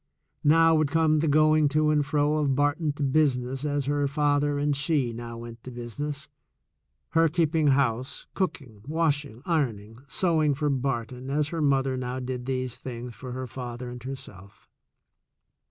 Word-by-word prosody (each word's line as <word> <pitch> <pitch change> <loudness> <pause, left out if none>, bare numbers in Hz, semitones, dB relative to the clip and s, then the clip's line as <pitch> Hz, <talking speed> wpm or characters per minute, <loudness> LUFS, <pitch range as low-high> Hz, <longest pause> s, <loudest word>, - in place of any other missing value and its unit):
Now 165 +2 +6
would 155 -2 +2
come 155 0 +3
the 160 - +1
going 155 +1 +4
to 155 +1 +2
and 150 -1 +3
fro 145 +1 +1
of 140 -3 +1
Barton 145 +2 +1
to 145 - -4
business 135 -2 +1
as 145 -2 -1
her 145 0 +1
father 145 0 +1
ana 145 0 +1
she 140 -4 0
now 115 0 -7
went 115 0 -9
to - - -7
business, 140 +5 -5 0.8
her 165 0 +4
keeping 160 -1 +2
house, 130 -3 +1
cooking, 140 - -3
washing, 145 -6 -1
ironing, 115 - -1
sewing 155 -3 +2
for 150 +1 0
Barton 130 -1 -2
as 150 +1 0
her 165 -1 -3
mother 135 -2 +2
now 125 0 -3
did 125 -1 -5
these 130 -2 -2
things 120 -1 -6
for 125 +1 -8
her 130 0 -4
father 125 -1 -6
and 125 0 -8
herself. 105 -7 -10
140 Hz, 160 wpm, -27 LUFS, 125-150 Hz, 0.8 s, Now